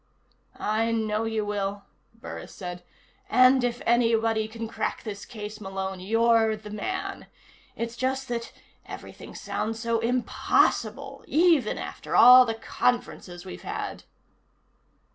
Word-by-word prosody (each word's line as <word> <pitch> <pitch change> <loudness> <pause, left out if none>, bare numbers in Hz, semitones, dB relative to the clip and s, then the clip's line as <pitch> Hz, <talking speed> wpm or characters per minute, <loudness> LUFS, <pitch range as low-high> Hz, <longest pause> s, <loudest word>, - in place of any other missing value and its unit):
"I 220 +2 0
know 220 -1 0
you 220 -1 -1
will," 200 -1 -3 0.3
Burris 230 - -9
said. 180 -2 -6 0.5
"And 255 -2 +5
if 245 0 -2
anybody 225 -2 +2
can 225 +1 -6
crack - - -3
this 205 -3 -6
case, 215 -1 -8
Malone, 190 -1 -4
you're 225 +2 +3
the 210 -1 -11
man. 370 - -4 0.5
It's 230 0 -4
just 260 +2 -2
that 235 -1 -3 0.4
everything - - -10
sounds 225 +1 -3
so 230 0 0
impossible. 240 +2 0
Even 320 -8 +3
after - - -5
all 250 +1 +9
the 225 - -1
conferences 210 -6 -2
we've 185 - -8
had." - - -5
225 Hz, 125 wpm, -26 LUFS, 210-240 Hz, 0.5 s, all